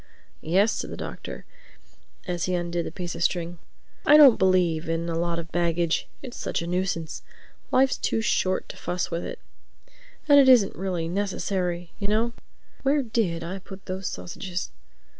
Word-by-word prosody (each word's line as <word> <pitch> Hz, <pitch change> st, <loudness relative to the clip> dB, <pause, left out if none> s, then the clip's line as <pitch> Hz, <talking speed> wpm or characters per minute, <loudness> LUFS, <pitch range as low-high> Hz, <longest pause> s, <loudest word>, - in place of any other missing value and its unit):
"Yes," 195 Hz, +7 st, +3 dB
said -, -, -4 dB
the -, -, -7 dB
Doctor, -, -, -7 dB, 0.8 s
as 175 Hz, -2 st, -2 dB
he 185 Hz, -, 0 dB
undid 175 Hz, -1 st, -2 dB
the -, -, -5 dB
piece 175 Hz, 0 st, -5 dB
of -, -, -7 dB
string. 170 Hz, -1 st, -1 dB, 0.4 s
"I 300 Hz, -, +7 dB
don't 280 Hz, -6 st, +8 dB
believe 175 Hz, -4 st, +2 dB
in 165 Hz, +1 st, -1 dB
a 165 Hz, -, -2 dB
lot 170 Hz, 0 st, -1 dB
of 165 Hz, -1 st, -6 dB
baggage. 170 Hz, -1 st, 0 dB, 0.2 s
It's 250 Hz, -, -8 dB
such -, -, -2 dB
a -, -, -4 dB
nuisance. 175 Hz, -2 st, -2 dB, 0.5 s
Life's 265 Hz, +1 st, +3 dB
too -, -, 0 dB
short 185 Hz, -4 st, 0 dB
to -, -, -8 dB
fuss 180 Hz, 0 st, -3 dB
with 170 Hz, +1 st, -2 dB
it. -, -, -5 dB, 0.9 s
And 285 Hz, -1 st, +8 dB
it 265 Hz, -2 st, +7 dB
isn't 235 Hz, -7 st, +6 dB
really 180 Hz, -3 st, -2 dB
necessary, 180 Hz, -2 st, -2 dB
you 200 Hz, -, -2 dB
know—Where 235 Hz, +5 st, -1 dB
did 210 Hz, -8 st, -1 dB
I 185 Hz, +3 st, -5 dB
put 190 Hz, 0 st, -12 dB
those 185 Hz, 0 st, -4 dB
sausages?" 175 Hz, -, -5 dB
180 Hz, 165 wpm, -26 LUFS, 170-205 Hz, 0.9 s, don't